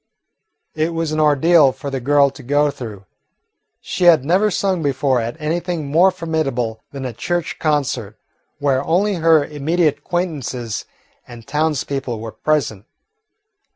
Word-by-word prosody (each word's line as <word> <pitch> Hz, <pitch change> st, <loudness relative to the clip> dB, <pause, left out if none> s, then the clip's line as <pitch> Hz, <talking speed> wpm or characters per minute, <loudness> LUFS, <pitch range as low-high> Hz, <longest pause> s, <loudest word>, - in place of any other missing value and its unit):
It 160 Hz, +2 st, -1 dB
was 165 Hz, -1 st, -1 dB
an 155 Hz, -, -1 dB
ordeal 150 Hz, 0 st, +5 dB
for 140 Hz, +1 st, -7 dB
the 135 Hz, -, -2 dB
girl 140 Hz, +2 st, +3 dB
to 140 Hz, -, -13 dB
go 145 Hz, +3 st, +1 dB
through. 110 Hz, -8 st, -9 dB, 0.8 s
She 180 Hz, -, -2 dB
had 160 Hz, -6 st, +6 dB
never 190 Hz, +7 st, +3 dB
sung 190 Hz, -2 st, 0 dB
before 135 Hz, -3 st, +1 dB
at 120 Hz, +7 st, -5 dB
anything 170 Hz, +1 st, -2 dB
more 175 Hz, +5 st, +5 dB
formidable 155 Hz, -, -2 dB
than 135 Hz, -2 st, -6 dB
a 125 Hz, -, -4 dB
church 170 Hz, +9 st, -3 dB
concert, 130 Hz, -8 st, -1 dB, 0.4 s
where 135 Hz, -2 st, +1 dB
only 195 Hz, +7 st, +1 dB
her 160 Hz, -3 st, +4 dB
immediate 150 Hz, 0 st, 0 dB
acquaintances 140 Hz, -, -3 dB, 0.4 s
and 120 Hz, -2 st, -11 dB
townspeople 140 Hz, -5 st, -2 dB
were 110 Hz, 0 st, -6 dB
present. 110 Hz, -4 st, -1 dB
145 Hz, 140 wpm, -19 LUFS, 130-165 Hz, 0.8 s, had